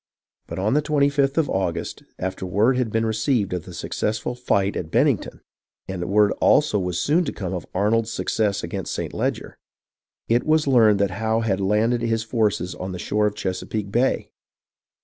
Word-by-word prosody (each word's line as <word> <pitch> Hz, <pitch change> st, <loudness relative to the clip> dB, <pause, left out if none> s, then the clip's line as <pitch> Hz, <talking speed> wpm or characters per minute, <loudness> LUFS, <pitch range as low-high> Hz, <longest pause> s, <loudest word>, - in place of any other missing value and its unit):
But 85 Hz, -, -6 dB
on 100 Hz, +5 st, +1 dB
the 150 Hz, -, +3 dB
25th 140 Hz, -1 st, +1 dB
of 160 Hz, -3 st, +3 dB
August, 85 Hz, -5 st, -2 dB, 0.2 s
after 95 Hz, 0 st, -4 dB
word 105 Hz, +8 st, +2 dB
had 125 Hz, -3 st, -1 dB
been 115 Hz, +1 st, +1 dB
re 110 Hz, -, 0 dB
ceived 110 Hz, -3 st, 0 dB
of 90 Hz, 0 st, -4 dB
the 90 Hz, -, -10 dB
successful 110 Hz, +7 st, -2 dB
fight 100 Hz, -5 st, 0 dB
at 80 Hz, -, -4 dB
Bennington -, -, +1 dB, 0.5 s
(and 90 Hz, -2 st, -4 dB
word 105 Hz, +1 st, +4 dB
also 145 Hz, -8 st, +4 dB
was 90 Hz, -2 st, -2 dB
soon 165 Hz, +5 st, +2 dB
to -, -, -2 dB
come 95 Hz, -3 st, -5 dB
of 90 Hz, -, -5 dB
Arnold's 110 Hz, +4 st, +1 dB
success 105 Hz, -3 st, -1 dB
against -, -, -4 dB
St. -, -, -4 dB
Leger), -, -, -3 dB, 0.7 s
it 120 Hz, +2 st, +2 dB
was 155 Hz, 0 st, +2 dB
learned 115 Hz, -6 st, +5 dB
that 100 Hz, -1 st, +1 dB
Howe 110 Hz, 0 st, +1 dB
had 100 Hz, -4 st, 0 dB
landed 110 Hz, +5 st, +2 dB
Ins 115 Hz, -1 st, 0 dB
forces 105 Hz, -5 st, 0 dB
on 95 Hz, 0 st, -6 dB
the -, -, -5 dB
shore 105 Hz, +4 st, 0 dB
of 105 Hz, -, -3 dB
Chesapeake 100 Hz, +2 st, -3 dB
Bay 125 Hz, +5 st, +1 dB
105 Hz, 185 wpm, -23 LUFS, 95-120 Hz, 0.7 s, learned